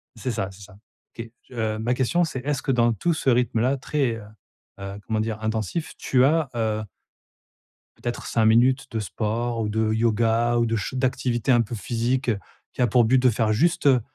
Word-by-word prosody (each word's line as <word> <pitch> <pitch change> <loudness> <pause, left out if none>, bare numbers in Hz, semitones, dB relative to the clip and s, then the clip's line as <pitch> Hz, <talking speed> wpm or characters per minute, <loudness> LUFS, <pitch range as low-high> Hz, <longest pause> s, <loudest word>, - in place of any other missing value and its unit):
C'est 130 - -3
ça, 100 -4 -2
c'est 95 +2 -15
ça. 100 0 -14 0.4
Qué 115 -1 -8 0.2
heu, 110 -3 -2
ma 120 +3 0
question, 135 +8 +1
c'est, 150 -5 -3
est-ce 145 -2 -1
que 140 - -1
dans 120 -2 +3
tout 170 - 0
ce 145 - 0
rythme-là 125 +1 +2
très, 135 -2 -1
heu, 110 - -9 0.6
heu, 100 +1 -6
comment 110 -1 -1
dire? 110 0 -2
Intensif, 110 - -2
tu 130 -1 +2
as, 155 0 +2
heu 110 -1 -1 1.1
peut-être 120 0 -5
5 115 -2 +1
minutes 125 +4 +4
de 110 - -2
sport 115 +4 -2
ou 105 - -1
de 110 0 0
yoga 115 +1 +2
ou 120 - +2
de 115 0 0
ch 105 +1 -3
d'activités 130 -2 0
un 120 -2 +5
peu 115 +1 -4
physiques 120 +3 -1 0.4
qui - - -4
a 125 - +4
pour 120 +2 +4
but 130 +4 +4
de 130 - +5
faire 110 -1 +1
juste, 160 +6 +2
heu, 130 -3 +5
120 Hz, 200 wpm, -24 LUFS, 110-130 Hz, 1.1 s, un